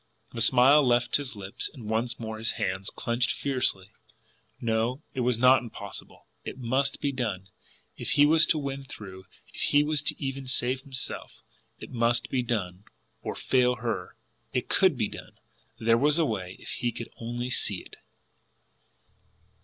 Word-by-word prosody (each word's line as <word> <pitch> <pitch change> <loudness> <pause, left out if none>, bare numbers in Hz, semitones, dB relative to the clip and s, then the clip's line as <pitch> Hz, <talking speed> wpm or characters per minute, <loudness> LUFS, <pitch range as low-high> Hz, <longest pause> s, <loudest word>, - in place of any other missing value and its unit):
The 115 - -4
smile 130 +5 +7
left 120 -1 +3
his 140 -5 -5
lips, 100 -1 -3
and 120 -8 -10
once 115 +2 0
more 110 -1 -5
his 115 - 0
hands, 95 +1 -2
clenched 120 +1 0
fiercely. 125 -8 0 0.7
No; 115 +5 0
it - - -4
was 125 -1 +2
not 130 +2 +6
impossible! 100 -4 -9 0.2
It - - -6
MUST 130 +3 0
be 140 - +1
done 105 -8 -3 0.5
if - - -1
he 145 - +6
was 160 +2 +5
to 160 - +3
win 140 -2 -4
through, 95 -7 -10 0.3
if - - -7
he 145 0 +4
was 150 -1 +1
even 135 -1 -4
to - - -5
save 130 0 +1
himself! 135 -2 -5 0.3
It - - -10
must 120 0 +1
be 130 - +1
done 100 -5 -3 0.4
or - - -4
FAIL 125 -1 +2
her! 115 -7 -4 0.4
It 125 -1 -1
COULD 185 -8 +4
be 110 -3 +1
done; - - -10 0.4
there 115 +1 +3
was 150 +3 +3
a 165 - +3
way 95 -7 -3
if - - -11
he 120 - -1
could 115 - -7
only 120 +2 -4
see - - 0
it! - - -14
120 Hz, 170 wpm, -28 LUFS, 110-135 Hz, 0.7 s, smile